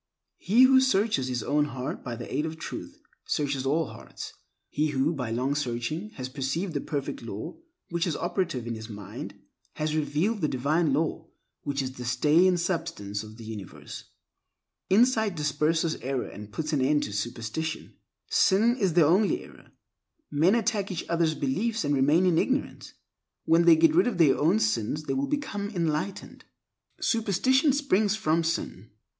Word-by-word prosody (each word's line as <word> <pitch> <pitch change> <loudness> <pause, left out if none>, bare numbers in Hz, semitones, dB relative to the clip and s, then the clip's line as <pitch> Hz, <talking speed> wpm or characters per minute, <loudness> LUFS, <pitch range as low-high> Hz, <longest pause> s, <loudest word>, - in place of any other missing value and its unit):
He 230 +7 +4
who 260 0 +7
searches 205 - +2
his 125 -1 -2
own 145 +1 +2
heart 130 -3 -5
by 120 -2 -4
the - - -8
aid 150 +3 0
of 160 0 -6
Truth, - - -7 0.3
searches 140 -3 -1
all 160 +4 +2
hearts. - - -9 0.4
He 150 +1 +1
who, 145 +2 +1
by 125 -6 -4
long 125 +5 0
searching, 145 - -3
has 130 -1 -5
perceived 145 +7 -3
the 145 - -1
Perfect 145 -3 -4
Law 115 - -7 0.3
which 170 +1 -1
is 160 - -1
operative 175 - -2
in 120 - -3
his 110 0 -8
mind, 105 -1 -8 0.4
has 155 0 -2
revealed 155 +8 0
the 155 - +2
Divine 145 +4 +1
Law 160 +3 -1 0.3
which 140 -1 -2
is 130 - -4
the 125 -1 -8
stay 150 +9 +4
and 180 -1 +2
substance 165 - -3
of 110 0 -11
the 115 - -10
universe. 110 -5 -8 0.8
Insight 220 -1 +3
disperses 155 +2 +1
error 130 -1 -3
and 105 0 -10
puts 155 +8 -3
an 140 - +2
end 145 +3 +2
to 105 - -5
superstition. 120 +9 -4 0.3
Sin 225 +6 +3
is 195 -8 +1
the 170 -3 +6
only 190 +7 +2
error, - - -16 0.6
Men 165 +8 +4
attack 215 -3 0
each 180 -4 -4
other's 165 -2 +1
beliefs 205 - -1
and 145 - +1
remain 145 +6 +3
in 170 -3 +3
ignorance. 270 +2 -2 0.5
When 165 +1 +4
they 170 -1 +8
get 160 -1 +4
rid 180 +7 +4
of 230 -7 -1
their 150 -6 +5
own 150 -5 +3
sins 110 +7 0
they - - -2
will 275 +1 -1
become 270 -9 -3
enlightened. 170 -1 -3 0.6
Superstition 255 - +2
springs 215 -8 +2
from 170 -6 +1
sin. 160 - -3
155 Hz, 170 wpm, -27 LUFS, 135-190 Hz, 0.8 s, they